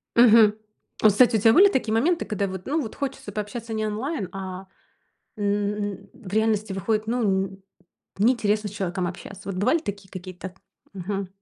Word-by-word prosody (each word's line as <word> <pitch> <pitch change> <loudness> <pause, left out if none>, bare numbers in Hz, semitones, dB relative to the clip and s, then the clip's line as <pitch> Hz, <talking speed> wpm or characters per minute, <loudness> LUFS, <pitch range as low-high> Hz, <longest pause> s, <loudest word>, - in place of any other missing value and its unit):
Мгм. 225 -3 +7 0.5
О, - - +9
кстати, 225 +2 +5
у - - -1
тебя 225 +2 +5
были 400 +7 +7
такие 240 - 0
моменты, 330 +10 +2
когда 200 -2 -1
вот, 185 -1 -7
ну 305 +3 0
вот, 220 - -6
хочется 270 -7 -5
пообщаться 220 +2 -5
не 215 0 -1
онлайн, 215 - -3
а, 190 0 -6 0.7
м, 205 0 -2
в 230 -6 -12
реальности 215 -1 +1
выходит, 215 +3 -1
ну, 240 +1 0
н 190 0 -2 0.6
неинтересно 215 -2 +2
с - - -11
человеком 185 -2 -2
общаться? 190 +2 -8
Вот 190 - -3
бывали 210 - +2
такие 200 - -7
какие-то? 185 0 -8 0.4
Мгм. 195 0 -4
210 Hz, 170 wpm, -24 LUFS, 195-225 Hz, 0.7 s, О